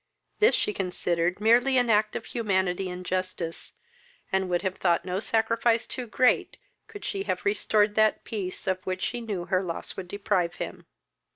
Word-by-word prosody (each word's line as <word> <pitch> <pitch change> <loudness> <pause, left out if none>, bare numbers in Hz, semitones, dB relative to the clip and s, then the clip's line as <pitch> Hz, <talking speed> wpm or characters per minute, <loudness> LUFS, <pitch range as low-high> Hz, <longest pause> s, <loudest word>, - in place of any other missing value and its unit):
This 435 +3 +6
she 210 - 0
considered 180 -2 -1
merely 240 +5 +4
as - - +6
an 240 -2 +1
act 210 0 +2
of - - -4
humanity 190 -5 0
and 180 0 -7
justice, 185 -2 -3 0.6
and 190 -1 +1
would 175 +1 0
have 190 -1 -2
thought 175 -1 +2
no 185 +1 -1
sacrifice 230 +2 +1
too 250 -2 -5
great, 250 +3 +2 0.3
could 410 -2 -9
she 395 - -2
have - - -2
restored 215 - +2
that 215 0 +3
peace 195 -5 -4
of 185 -1 -1
which 185 0 -3
she 240 - -2
knew 200 -6 -4
her 185 +1 +1
loss 170 -3 -4
would 185 - -6
deprive 180 -3 0
him. - - -7
195 Hz, 180 wpm, -27 LUFS, 180-230 Hz, 0.6 s, This